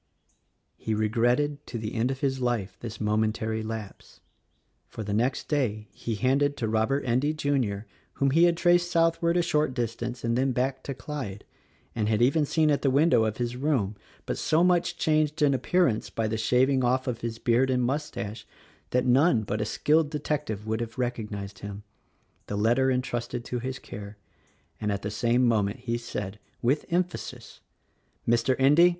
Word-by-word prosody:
He 110 - -2
regretted 120 +7 +1
to 120 - -5
the 110 0 -4
end 120 +2 +1
of 135 +1 -4
his 135 -2 0
life 120 -6 -1
this 110 -3 -7
momentary 110 +1 0
lapse; 110 -2 -7 0.7
for 110 - -7
the 100 0 -3
next 120 +5 0
day 110 -8 -1
he 115 +1 -4
handed 140 +5 +1
to 115 - -1
Robert 110 +6 +1
Endy, 130 +5 +1
Jr. 130 -9 0 0.2
— - - -36
whom 140 -1 +1
he 165 +4 +5
had 170 -1 +3
traced 175 0 +3
southward 170 0 +2
a 175 - +3
short 150 -5 +1
distance 120 0 -3
and 115 0 +1
then 130 +1 +1
back 130 +2 -1
to 140 - -4
Clyde, 125 -9 -6 0.5
and 110 -2 -1
had 110 -1 +2
even 140 +5 +3
seen 155 0 +3
at 145 - +1
the 140 - +2
window 135 -4 +4
of 110 -1 -2
his 120 0 -2
room 125 -7 0 0.3
(but - - -3
so 160 +2 +3
much 175 -1 +2
changed 155 0 +1
in 140 -1 +4
appearance 130 -2 +1
by 115 -1 -1
the 110 - -1
shaving 130 +4 +2
off 130 +1 +2
of 125 -3 -3
his 115 -1 -3
beard 120 +3 +2
and 125 -1 +2
mustache 125 -5 -3 0.4
that 125 0 +1
none 125 -2 +4
but 105 +1 -2
a - - 0
skilled 150 +6 +2
detec 150 0 -2
tive 105 -1 -4
would 110 +1 -1
have 115 0 -5
recognized 105 -6 -4
him) 100 0 -7 0.3
— - - -41
the 105 - -3
letter 120 +5 +3
entrusted 125 -2 -2
to 125 - -3
his 130 +2 -4
care, 100 -1 -9 0.6
and 105 -1 -1
at 100 -1 -3
the 105 - -3
same 120 +4 +2
moment 110 0 +1
he 120 -2 -2
said 105 -4 -5
— - - -39
with 135 +5 +2
emphasis 180 +1 -3 0.3
— - - -40
"Mr. 120 +2 +3
Endy! 150 +6 +6
125 Hz, 190 wpm, -27 LUFS, 110-140 Hz, 0.7 s, Endy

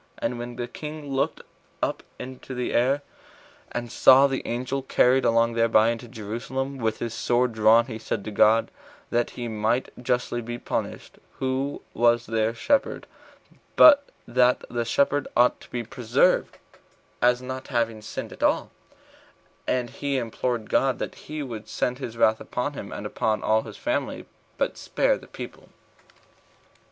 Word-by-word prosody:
And 120 - -2
when 120 0 -6
the 120 0 -4
king 150 +2 -7
looked 135 0 -1 0.4
up - - -1 0.2
into 130 0 -8
the 125 0 -2
air, 135 +4 +2 0.7
and 120 -1 -4
saw 135 +2 +7
the 135 -1 0
angel 130 +3 -2
carried 130 0 +3
along 115 0 +3
thereby 115 -1 +4
into 115 +1 -4
Jerusalem, 125 +5 -4
with 110 -2 0
his 115 -1 -4
sword 120 +1 +1
drawn, 110 +1 +5
he 115 -3 -7
said 110 - -3
to 110 - -4
God, 110 +2 +4 0.4
that 120 0 +1
he 120 -1 -3
might 110 +3 0
justly 125 -1 -1
be 120 +1 -5
punished, - - -5 0.2
who 135 +2 -2
was 120 0 +3
their 110 +1 0
shepherd, 280 - 0 0.7
but 285 -2 +8 0.2
that 125 0 +3
the 120 -1 -1
sheep 135 +5 +2 0.2
ought 125 +1 +4
to - - -15
be 120 -1 -3
preserved, 125 +8 +1 0.6
as 125 +1 +4
not 130 +1 -6
having 115 -4 -1
sinned 105 - -6
at - - -14
all; - - +1 1.0
and 125 -2 0
he 140 -1 -2
implored 120 -1 -2
God 135 -2 +2
that - - -4
he 155 -1 -6
would 115 -5 -7
send 125 +1 -1
his 120 -4 -6
wrath 110 -1 +3
upon 125 +4 -3
him, 100 -7 -7
and 105 - -6
upon 110 +1 -1
all 110 0 +3
his - - -10
family, 300 +1 -2 0.3
but - - -1
spare - - +1
the - - -15
people. - - -9
120 Hz, 160 wpm, -25 LUFS, 115-130 Hz, 1.0 s, but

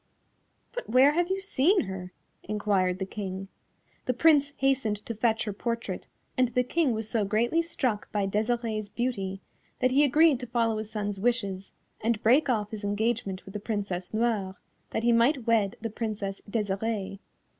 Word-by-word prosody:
"But - - -5
where 260 +5 +6
have 345 +3 +1
you 380 +1 0
seen 385 -1 +3
her?" 190 -2 -6 0.3
enquired 200 -3 0
the 190 - -3
King. 190 -1 -5 0.6
The 250 - 0
Prince 290 -1 +4
hastened 265 -6 +1
to 230 - -3
fetch 225 0 +1
her 210 - -3
portrait, 230 +3 -3 0.3
and 255 -1 +3
the 250 +1 +1
King 290 0 +1
was 220 -1 -2
so 220 -1 +1
greatly 230 +10 +2
struck 255 -10 -2
by 205 -2 0
Desirée's 215 +1 -1
beauty 195 -6 -2 0.4
that 255 0 +2
he 280 +3 +5
agreed 295 0 +5
to 250 - -6
follow 230 -2 +1
his 215 -1 -5
son's 205 -2 -3
wishes 200 -4 -1 0.3
and 225 -1 0
break 260 +6 +4
off 210 -4 0
his 215 -1 -6
engagement 205 -2 -1
with 195 - -10
the 210 - -3
Princess 200 -4 -3
Noire, 215 -4 0 0.3
that 225 - -2
he 240 - +4
might 235 +2 +3
wed 220 -4 +2
the 225 -1 -3
Princess 210 -3 -4
Desirée. 200 -1 -2
225 Hz, 170 wpm, -28 LUFS, 205-250 Hz, 0.6 s, where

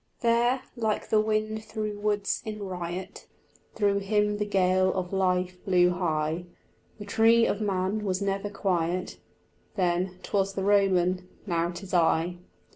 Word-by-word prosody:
There, 240 +2 +2
like 220 -3 -1
the 215 - +4
wind 215 0 -1
through 215 -1 -4
woods 205 -1 0
in 215 -2 -5
riot, 180 0 -6 0.5
Through 200 -2 +2
him 210 +1 +1
the 210 - -1
gale 185 -1 +3
of 185 0 -3
life 180 -1 0
blew 180 -2 +4
high; 165 -1 -1 0.5
The 205 - -8
tree 225 +3 +4
of 205 - -1
man 195 +1 -1
was 190 -2 -1
never 200 0 -2
quiet: 180 -3 -1 0.6
Then 180 -1 0
'twas 195 -1 0
the 195 - -2
Roman, 185 -2 +2 0.2
now 170 -3 0
'tis 180 +2 -8
I. 170 0 +2
195 Hz, 140 wpm, -27 LUFS, 180-210 Hz, 0.6 s, the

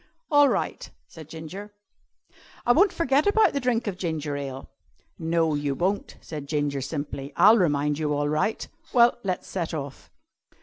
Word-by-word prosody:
"All 290 -1 +6
right," - - -2 0.2
said 160 -2 -13
Ginger. 185 +6 -9 0.9
"I 245 - +5
won't 375 +9 +5
forget 290 -1 +1
about 430 +2 +4
the 280 - 0
drink 250 -3 0
of 190 -3 -4
ginger 155 -5 -3
ale." 135 -2 -6 0.5
"No, 165 -1 +1
you 145 -1 -1
won't," 190 +6 -2
said 150 -3 -7
Ginger 145 -2 -1
simply. 140 0 -5
"I'll 215 +3 +6
remind 150 -3 +1
you 150 -1 -1
all 145 0 0
right. 155 +9 -1 0.3
Well, 240 -1 +5
let's 185 -2 -3
set 170 -3 -3
off." 140 -2 -7
160 Hz, 160 wpm, -25 LUFS, 145-215 Hz, 0.9 s, All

